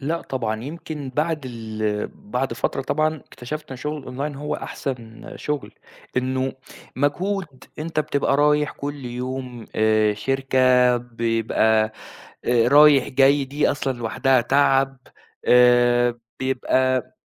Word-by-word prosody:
لأ 160 +4 -2
طبعًا 110 -4 -3
يمكن 150 -2 -6
بعد 155 +2 0
ال 110 -3 -3
بعد 125 +3 -3
فترة 135 +3 -2
طبعًا 155 +3 0
اكتشفت 150 +1 -8
إن 130 - -6
شُغل 150 +4 -4
الأونلاين 135 +2 -5
هو 150 +2 -4
أحسن 115 -4 -6
شُغل، 150 -2 -4 0.4
إنّه 130 +1 0 0.4
مجهود 160 +1 -2
أنت 155 0 -2
بتبقى 140 -2 0
رايح 150 0 +3
كل 145 -1 -6
يوم 125 -1 -5
آآ 110 -1 +3
شركة 130 +1 +3
بيبقى، 115 -2 +1 0.5
آآ 120 -1 +3
رايح 145 -1 +6
جاي 140 +2 +4
دي 145 +3 0
أصلًا 135 -3 -2
لوحدها 130 +3 +2
تعب، 135 +1 +2 0.5
آآ 120 -1 +4 0.2
بيبقى 130 0 0
130 Hz, 120 wpm, -22 LUFS, 120-145 Hz, 0.5 s, رايح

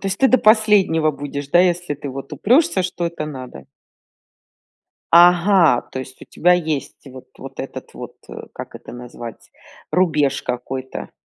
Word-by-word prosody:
То 195 - -3
есть 195 - -3
ты 265 - +4
до 255 - +4
последнего 210 -8 +3
будешь, 140 -1 -6
да? 175 +4 +4
Если 175 -3 0
ты 145 0 -8
вот 135 +1 -8
упрешься, 240 - +2
что 175 -1 -3
это 170 -2 -5
надо. 130 - -9 1.5
Ага, 175 -4 +5
то 130 - -5
есть 130 0 -11
у - - -10
тебя 180 +1 +2
есть 160 -5 -2
вот 130 -1 -12
вот - - -9
этот - - -9
вот, - - -9 0.4
как - - -9
это - - -11
назвать, 120 -1 -10 0.4
рубеж 155 -6 +1
какой-то? 130 +1 -5
155 Hz, 155 wpm, -20 LUFS, 135-180 Hz, 1.5 s, Ага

